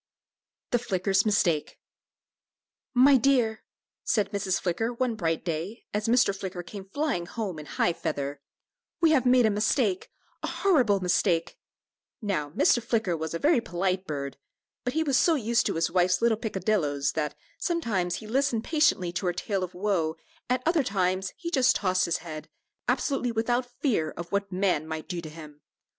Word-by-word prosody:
THE 245 - +3
FLICKER'S 195 -2 +1
MISTAKE. 175 -7 +1 1.2
"My 265 +2 +7
dear," 240 -4 +2 0.4
said 210 -3 +1
Mrs. 195 -2 0
Flicker, 195 +6 -1
one 245 0 -1
bright 165 -6 -2
day, 170 +7 -4
as 210 +1 -1
Mr. 235 -4 +3
Flicker 185 -2 -5
came 195 +2 -9
flying 275 - -1
home 195 -8 -4
in 150 - -9
high 175 - +1
feather, 140 -3 -4 0.6
"we 330 -1 +4
have 260 -5 +3
made 250 -1 +5
a 220 - +3
mistake 210 -1 +1 0.3
a - - -3
horrible 250 - +2
mistake." 175 -1 +1 0.6
Now, 195 - -2
Mr. 240 +10 +3
Flicker 220 -6 0
was 160 0 -4
a - - +1
very 290 - +3
polite 185 -1 -2
bird, 140 -2 -4 0.5
but 250 - -2
he 320 - +1
was 275 -4 +2
so 335 - +4
used 235 -3 +1
to - - -1
his 165 0 0
wife's 180 0 +3
little 230 -1 +3
peccadilloes 190 -9 0
that, 150 -2 -2
though - - -41 0.2
sometimes 220 - 0
he 220 - -8
listened 240 0 0
patiently 300 - +2
to 180 +1 -2
her 175 - +1
tale 195 +2 -2
of 180 0 -6
woe, 180 -5 0 0.3
at 255 0 +1
other 330 -1 +3
times 190 -4 0
he 340 -1 -5
just 260 -5 +4
tossed 185 -2 +1
his 170 - 0
head, 155 -2 -7 0.4
absolutely 265 -4 0
without 240 +2 0
fear 205 - +1
of 170 0 -7
what 200 0 -1
man 180 -5 0
might 160 0 -5
do 175 -2 -4
to 160 - -8
him. 150 -2 -12
200 Hz, 175 wpm, -27 LUFS, 175-240 Hz, 1.2 s, My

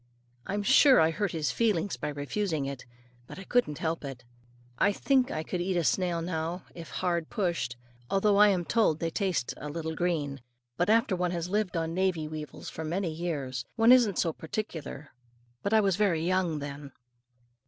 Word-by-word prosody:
I'm 205 +1 -1
sure 265 +3 +7
I 160 0 +4
hurt 195 +4 -1
his 155 -3 -1
feelings 205 -5 +1
by 150 - -4
refusing 150 +2 -2
it. 135 -2 -6 0.4
But - - -10
I 195 - -7
couldn't 195 - +1
help 165 0 -2
it. 135 -3 -7 0.6
I 205 - +4
think 260 +4 +2
I 155 - -3
could 180 +2 -3
eat 185 0 0
a 170 - +1
snail 175 0 +1
now, 170 +1 -3
if 165 -3 -9
hard 170 -3 -1
pushed, 170 - -1 0.3
although 200 +1 +3
I 210 +1 +8
am 185 -4 +1
told 215 -9 +2
they 165 0 -2
taste 185 - -1
"a 150 - -6
little 160 +1 -4
green." 155 -6 -1 0.3
But 175 +7 0
after 225 -3 +3
one 180 0 0
has 170 0 -3
lived 205 -3 0
on 165 0 -2
Navy 180 -4 0
weevils 155 -1 -7
for 160 - -6
many 170 +2 -1
years, 145 -7 -3
one 225 +1 +5
isn't 235 -7 +5
so 165 - +1
particular; 160 -5 -6 0.5
but 200 - -2
I 220 0 +5
was 195 -3 +1
very 175 -6 +2
young 180 -3 +1
then. 140 -1 -7
170 Hz, 185 wpm, -29 LUFS, 155-200 Hz, 0.6 s, I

